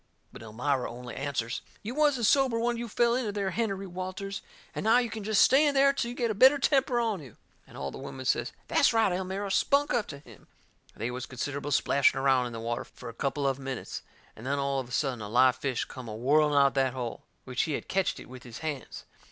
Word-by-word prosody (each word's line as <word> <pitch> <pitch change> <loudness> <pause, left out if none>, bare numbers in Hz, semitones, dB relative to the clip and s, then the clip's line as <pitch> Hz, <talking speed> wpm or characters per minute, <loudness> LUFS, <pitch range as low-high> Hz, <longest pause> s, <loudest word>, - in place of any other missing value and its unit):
But - - -10
Elmira 125 +4 -1
only 125 0 -8
answers: 135 -4 -3 0.2
"You 225 +4 -4
wasn't 290 -5 +2
sober 265 0 +4
when 235 +1 0
you 235 0 -4
fell 235 +2 +2
into 240 -4 -1
there, 200 -2 -2
Hennerey 195 -3 -2
Walters. 185 +2 -5 0.3
And - - -4
now 225 +3 +5
you 240 -2 0
can 220 -2 -5
jest 215 0 +4
stay 270 +3 +5
in 285 - +1
there 275 0 +5
till 235 -4 -2
you 240 - -6
get 235 -2 0
a - - 0
better 260 +7 +6
temper 265 -3 +2
on 220 -6 -1
you!" 130 -7 -13 0.3
And - - -13
all 70 0 -4
the - - -9
women 135 -1 -7
says: - - +1 0.2
"That's 275 - +4
right, 225 -4 +3
Elmira; 190 +2 -3
spunk 285 +8 +2
up 235 -4 0
to 145 - -7
him!" 120 -7 -16 0.5
They 115 +3 -3
was 125 +1 -5
considerable 140 +3 -4
splashing 140 -1 +3
around 135 -2 +3
in - - -7
the 115 - -5
water 115 +1 -3
fur 125 - -11
a - - -9
couple 140 +3 -1
of 135 0 0
minutes. 135 -2 -5 0.3
And 110 - -12
then, 140 +2 -1
all 140 -1 0
of 125 -2 -6
a - - -14
sudden, 130 -3 -1
a 105 - -6
live 125 +2 +4
fish 130 -2 -2
come 130 -2 -9
a 105 - -5
whirling 145 +5 +3
out 140 - +7
of - - -17
that 130 -2 +1
hole, 125 -3 -5 0.2
which 125 -1 -1
he - - 0
had - - -4
ketched 190 -1 0
it - - -11
with 125 0 -11
his 120 -2 -10
hands. 145 -5 -5
145 Hz, 245 wpm, -29 LUFS, -, 0.5 s, out